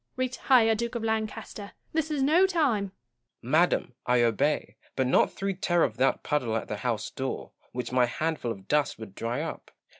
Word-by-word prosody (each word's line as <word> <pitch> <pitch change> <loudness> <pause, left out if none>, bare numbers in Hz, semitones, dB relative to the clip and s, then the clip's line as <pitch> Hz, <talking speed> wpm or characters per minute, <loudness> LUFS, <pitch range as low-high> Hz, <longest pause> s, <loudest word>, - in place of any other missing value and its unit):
Retire, 255 -2 +3
Duke 235 +2 -3
of 235 - -2
Lancaster! 220 -2 -3 0.2
This 320 -1 0
is 295 -3 0
no 335 +7 +5
time 285 - +1
Gaunt. 195 - -10 0.5
Madam, 155 0 +2
I 125 -1 +4
obey; 125 +6 +1 0.2
but 130 - +1
not 125 - +3
through 195 0 -2
terror 175 -3 +2
of 115 -3 -1
that 135 +1 +2
puddle 125 -7 0
at - - -5
the 105 - -4
house 115 -1 -2
door, 135 0 -4 0.2
which 125 -1 -4
my 125 -1 +3
handful 155 -2 -2
of 95 -3 -9
dust 150 -1 +1
would 110 -4 -9
dry 115 +6 -3
up. 165 - -6
160 Hz, 185 wpm, -28 LUFS, -, 0.5 s, no